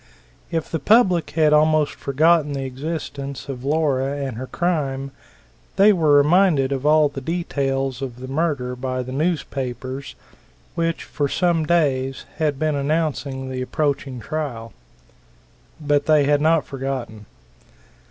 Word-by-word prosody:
If 165 -2 -3
the 165 - -1
public 195 -6 +3
had 155 -2 +4
almost 155 0 +3
forgotten 150 +2 +2
the 135 -1 -3
existence 140 -1 -5
of 130 -3 -6
Laura 140 -2 0
and 135 -4 -4
her 130 +3 -6
crime, 140 -6 -2 0.6
they 205 +2 +6
were 155 -5 +4
reminded 150 -2 +4
of 135 +1 -1
all 155 0 +5
the 140 -1 -7
details 135 -4 -2
of 125 -3 -6
the 130 - -7
murder 135 -3 -1
by 130 0 -3
the 130 - -8
newspapers, 135 -4 -3 0.6
which 165 0 -1
for 145 -2 -2
some 170 -2 +1
days 135 -6 +1
had 150 -3 0
been 155 +1 0
announcing 140 -2 -2
the 130 0 -3
approaching 140 -1 -2
trial. 120 -4 -5 1.1
But 145 -1 +1
they 155 -2 +5
had 145 +1 +2
not 160 -1 +3
forgotten. 130 -6 -5
145 Hz, 135 wpm, -22 LUFS, 135-155 Hz, 1.1 s, they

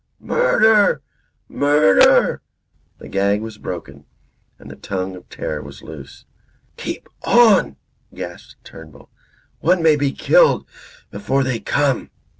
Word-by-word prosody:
Murder! 220 - +2 0.4
Murder!" 145 -8 +3 0.6
The - - -12
gag 100 +1 0
was 110 -1 -9
broken; 70 -5 -8 0.5
and - - -13
the - - -10
tongue 95 -1 -5
of 90 - -15
terror 75 -1 -5
was 70 -1 -12
loose. 75 -3 -12 0.5
"Keep - - -7
on!" 220 - +4 0.4
gasped - - -10
Turnbull. 75 -4 -15 0.5
"One 175 +1 +1
may 160 -2 +5
be 145 -2 -1
killed - - +3 0.5
before 135 -8 -1
they 130 -3 -2
come." 140 -1 -1
115 Hz, 115 wpm, -19 LUFS, -, 0.6 s, may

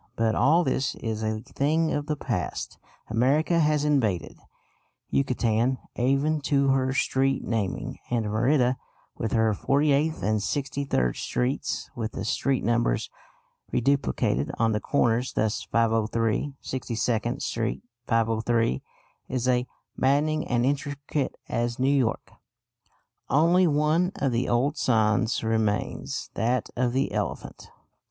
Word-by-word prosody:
But 110 -1 +1
all 160 +9 +4
this 135 -2 0
is 110 -2 -4
a 110 0 -2
thing 155 +5 0
of 145 0 -2
the 150 - 0
past. - - -4 0.3
America 140 +9 +2
has 150 -2 +2
invaded 115 - 0 0.7
Yucatan 125 -1 +1 0.2
even 140 +5 +1
to 140 -1 +2
her 130 -1 +2
street 135 0 +1
naming, 110 -5 -2
and 120 -2 0
Merida, 125 +4 +2 0.4
with 115 - -3
her 110 -1 +3
48th 145 +6 +1
and 110 +2 +1
63rd 135 - -1
Streets, 125 +3 -2
with 115 -2 -4
the 95 - -4
street 135 +4 0
numbers 120 - +1 0.6
reduplicated 135 - +1
on 115 0 +2
the 105 - 0
corners 120 0 +1
thus: 110 -1 0
503, 115 +3 +1
62nd 120 -1 -2
Street, 115 +1 -2 0.2
503, 115 - +1 0.5
is 130 -1 -1
as 125 -1 +2 0.3
maddening 150 +4 +1
and 120 0 +1
intricate 140 +1 -2
as 120 0 -1
New 135 +2 +2
York. 125 -5 0 1.0
Only 170 +5 +4
one 155 +5 +2
of 135 - 0
the 120 +1 0
old 135 +6 +1
signs 110 0 +2
remains, 110 -2 -1
that 120 +1 0
of 125 -1 0
the 135 +2 0
elephant. 105 -3 -4
125 Hz, 125 wpm, -26 LUFS, 115-140 Hz, 1.0 s, all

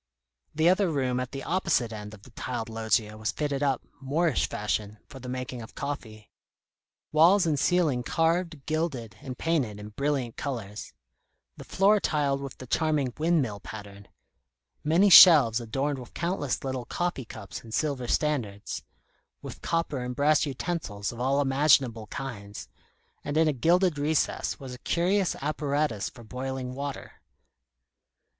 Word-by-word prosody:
The 160 +2 +3
other 185 +1 +4
room 130 -5 0
at 125 -1 -4
the 135 -1 -6
opposite 165 -11 0
end 105 0 -7
of 100 - -20
the 125 - -15
tiled 120 -1 -4
loggia 110 -1 0
was 110 - -1
fitted 145 -2 -2
up, 140 -2 +1 0.2
Moorish 150 +2 +1
fashion, 105 0 -2
for 135 - -11
the 125 0 -8
making 125 -1 -5
of 110 - -11
coffee; 110 -7 -6 0.8
walls 175 +5 +5
and 150 -4 +1
ceiling 160 -8 +2
carved, 165 +1 0
gilded, 145 - -2
and 130 -2 -7
painted 135 -11 -1
in 105 0 -8
brilliant 135 0 -2
colours; 110 -7 -5 0.6
the - - -10
floor 205 +2 +3
tiled 145 -6 0
with 140 -2 -7
the 130 - -9
charming 145 -2 0
"windmill" 150 -11 +1
pattern; 100 -1 -10 0.8
many 165 +7 +4
shelves 145 - +9
adorned 135 +5 -2
with 125 - -12
countless 170 -6 -2
little 130 -2 -3
coffee 175 -4 -2
cups 110 -3 -9
in 115 - -12
silver 135 -1 -1
standards; 120 -11 -1 0.6
with - - -8
copper 165 -4 -1
and 125 0 -4
brass 150 +2 +3
utensils 130 - -3
of 120 - -10
all 135 +3 +1
imaginable 135 -5 +3
kinds; 105 -6 -7 0.6
and 145 +1 -2
in 160 0 +4
a 155 - +2
gilded 170 +4 +2
recess 150 +1 0
was 130 -2 -8
a 125 - -10
curious 185 +5 +1
apparatus 145 -6 -1
for 120 - -14
boiling 130 +2 -5
water. 140 +1 -6
135 Hz, 150 wpm, -27 LUFS, 115-155 Hz, 0.8 s, shelves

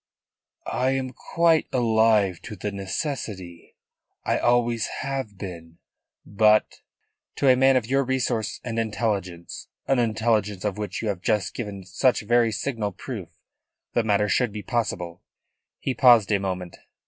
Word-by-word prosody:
"I 130 +2 0
am 130 -1 -2
quite 165 +5 +2
alive 110 -6 +3
to 105 - -7
the 105 +2 -4
necessity. 95 - -5 0.5
I - - +1
always 120 -1 +2
have 135 -7 -4
been. 85 -4 -8 0.5
But 105 +1 +3 0.2
" - - -53
"To 140 - +1
a 130 - +7
man 135 +1 +4
of 125 -3 +2
your 135 +3 +2
resource 125 -4 -1
and 115 -2 -3
intelligence 100 -6 -3 0.2
an 135 -2 +2
intelligence 110 -3 0
of 105 0 -2
which 105 +2 -4
you 110 - 0
have 95 -3 -3
just 105 -3 0
given 105 -5 -6
such 110 +7 +1
very 120 +1 +3
signal 110 -3 -2
proof - - -7 0.6
the 120 - +3
matter 105 -1 +2
should 120 +2 +1
be 105 0 -6
possible." 90 -7 -2 0.6
He 135 - -2
paused 120 -6 +6
a 100 - +3
moment. 90 -2 -4
110 Hz, 150 wpm, -25 LUFS, 100-125 Hz, 0.6 s, a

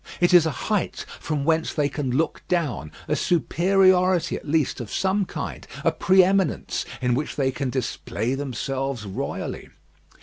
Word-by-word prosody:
It 175 +1 +3
is 170 -3 +7
a 150 - -4
height 210 -3 -1
from 150 -3 -2
whence 160 0 +1
they 150 -2 +2
can 145 -2 -3
look 140 +6 0
down; 150 - -1 0.2
a - - +1
superiority 185 +1 +3
at - - -8
least 150 -4 +1
of 110 -4 -7
some 195 +1 +1
kind; - - -6 0.2
a - - +4
pre 190 0 +5
eminence 190 -3 0 0.2
in 125 -1 +2
which 145 +5 -2
they 135 -2 +1
can 135 0 -3
display 125 -1 -2
themselves 135 -2 -3
royally. 95 - -5
155 Hz, 160 wpm, -24 LUFS, 135-180 Hz, 0.2 s, is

